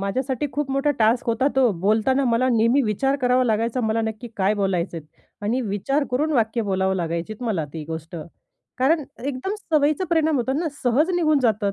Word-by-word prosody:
माझ्यासाठी 255 +7 -2
खूप 290 -2 -2
मोठा 275 +2 +1
टास्क 225 +2 +2
होता 235 +4 +2
तो! 260 -3 +4
बोलताना 225 +7 +2
मला 245 +2 +2
नेहमी 235 +3 +3
विचार 265 +5 0
करावा 250 0 +3
लागायचा 230 +2 0
मला 220 -1 0
नक्की 220 +2 -4
काय 195 +2 +2
बोलायचे 190 -4 -1
आहेत? 155 -2 -8 0.4
आणि 230 +5 0
विचार 235 +7 -1
करून 300 +5 0
वाक्य 230 -3 +1
बोलावं 190 -1 0
लागायचीत 170 +6 -4
मला 210 -10 -1
ती 160 -2 -6
गोष्ट, 160 +2 -7 0.6
कारण 295 +4 +2 0.2
एकदम 280 +8 -3
सवयीचं 305 -2 +1
परिणाम 320 -2 +2
होतात 260 +2 -1
ना 335 0 -1
सहज 270 +8 +2
निघून 310 -4 +3
जातात. 215 -4 +1
235 Hz, 180 wpm, -23 LUFS, 205-275 Hz, 0.6 s, तो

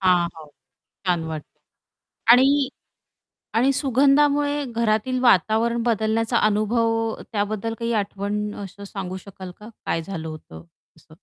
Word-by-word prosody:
हां, 180 -2 +4
हां. 160 -1 -11 0.6
छान 175 -3 +1
वाटतं. 155 -2 -7 0.8
आणि 270 +2 +5 0.9
आणि 265 +4 +4
सुगंधामुळे 285 +2 +3
घरातील 230 +2 0
वातावरण 230 +1 +3
बदलण्याचा 225 0 +1
अनुभव 215 +2 +1 0.4
त्याबद्दल 215 +1 -2
काही 230 0 -1
आठवण 205 +1 -3
असं 200 +1 -10
सांगू 190 -2 -5
शकाल 190 -1 -10
का? 210 - -11 0.2
काय 165 - 0
झालं 165 -3 -6
होतं 150 - -10 0.3
असं? - - -19
215 Hz, 120 wpm, -23 LUFS, 190-240 Hz, 0.9 s, आणि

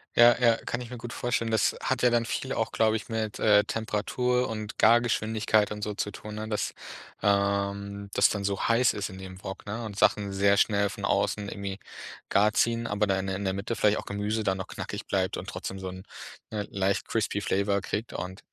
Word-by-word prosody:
Ja, 120 0 +8
ja, 115 -2 +5
kann 120 - -2
ich 120 - -8
mir 125 - -7
gut 120 +1 -7
vorstellen. 120 -2 -1
Das 110 - +2
hat 130 -1 0
ja 125 - +5
dann 120 -1 +2
viel 130 +3 -3
auch, 115 - -1
glaube 110 0 +2
ich, 110 - -5
mit, 110 -2 -2
äh, 105 -1 +5
Temperatur 125 +4 0
und 110 -1 -5
Gargeschwindigkeit 110 -2 +3
und 105 0 -5
so 105 - -2
zu 105 - -2
tun, 105 0 -9
ne? 110 +1 -5
Dass, 105 - -1 0.5
äh, 100 0 0
das - - +5
dann 100 -1 -2
so 100 0 -1
heiß 115 +2 +4
ist 100 -1 -3
in 95 - -9
dem 95 0 -10
Wok, 95 +2 -7
ne? 115 +3 -4
Und 100 -2 -6
Sachen 100 -2 +3
sehr 100 +1 +4
schnell 100 -1 +3
von 100 0 -5
außen 100 +1 0
irgendwie 100 -1 -5 0.5
gar 105 +2 +4
ziehen, 115 +1 +1
aber 105 +1 +1
dann 95 -1 +1
in 95 - -3
der 95 - -1
in 100 - -4
der 95 - +1
Mitte 100 +4 -3
vielleicht 105 0 +3
auch - - -8
Gemüse 105 +2 -2
dann 95 -2 +1
noch 95 - -5
knackig - - -6
bleibt 95 -2 0
und - - -7
trotzdem 95 - -5
so 95 -1 -5
'n, 95 0 -9 0.5
ne, 105 -1 -3
leicht 100 +1 0
crispy 105 -2 0
flavour 100 +1 +1
kriegt 105 +4 -3
und, 90 +2 -5
105 Hz, 225 wpm, -28 LUFS, 100-115 Hz, 0.5 s, Ja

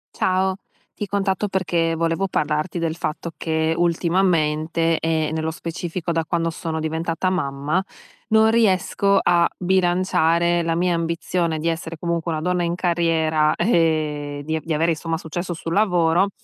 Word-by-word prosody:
Ciao, 190 0 +1 0.4
ti 205 - -3
contatto 200 0 -1
perché 170 -3 0
volevo 165 +4 0
parlarti 155 0 -1
del 165 -1 -1
fatto 170 0 -4
che, 160 0 0
ultimamente 165 -2 +1
e, 160 -1 0
nello 160 0 -2
specifico, 170 +1 -4
da 165 -1 0
quando 165 0 0
sono 160 0 -4
diventata 165 +3 -1
mamma, 150 0 -1 0.5
non 220 0 +5
riesco 200 -2 +2
a 170 -1 +3
bilanciare 175 -2 +2
la 165 0 0
mia 175 +1 +1
ambizione 165 0 -1
di 160 - -2
essere, 165 0 -3
comunque, 170 0 -2
una 155 -1 -2
donna 180 +1 0
in 170 0 0
carriera, 165 -3 +1
ehm, 155 -6 0
di 160 +2 -2
di 160 +1 -4
avere, 165 +2 +2
insomma, 165 0 -2
successo 175 +2 -4
sul 165 0 -5
lavoro, 180 -2 +3
170 Hz, 145 wpm, -22 LUFS, 160-180 Hz, 0.5 s, non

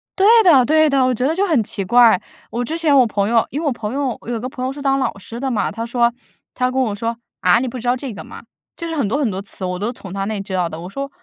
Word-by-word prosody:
对 390 +1 +3 0.2
的 275 -9 +6
对 310 +1 +4
的， 270 -2 +3
我 255 - +2
觉 250 +3 -1
得 320 - +1
就 400 +1 +1
很 280 -10 +2
奇 200 -1 -4
怪。 235 -3 +5 0.3
我 240 +1 -2
之 325 +5 -3
前 310 -4 +2
我 250 -3 +5
朋 205 0 -1
友 230 -1 +3
因 295 - -3
为 - - -4
我 - - +2
朋 225 -1 -4
友 275 -3 -2
我 - - -16
有 235 - -1
个 255 +3 -5
朋 255 0 -5
友 260 - -1
是 285 - -9
当 275 -1 +1
老 260 - -2
师 230 +4 -9
的 270 0 -2
嘛， 220 - 0
他 230 0 -5
说 235 0 +1 0.4
他 250 0 0
就 255 - -3
跟 265 - +1
我 220 -5 0
说： 230 +2 -3 0.2
“啊， 180 +3 +4
你 260 - -2
不 245 +1 -5
知 240 - -6
道 245 - +3
这 255 -3 -6
个 - - -8
吗？” - - -11 0.3
就 335 - -5
是 325 - -4
很 265 -9 0
多 235 - 0
很 260 -8 0
多 190 +1 -4
词， 195 -1 -7
我 180 0 -3
都 210 - -2
是 245 - -3
从 195 -6 -9
他 195 0 -2
那 220 - -3
里 200 - -3
知 195 -1 -7
道 180 -2 +1
的。 160 - -7
我 180 - -7
说： 275 +6 -5
245 Hz, 360 characters per minute, -19 LUFS, 210-275 Hz, 0.4 s, 的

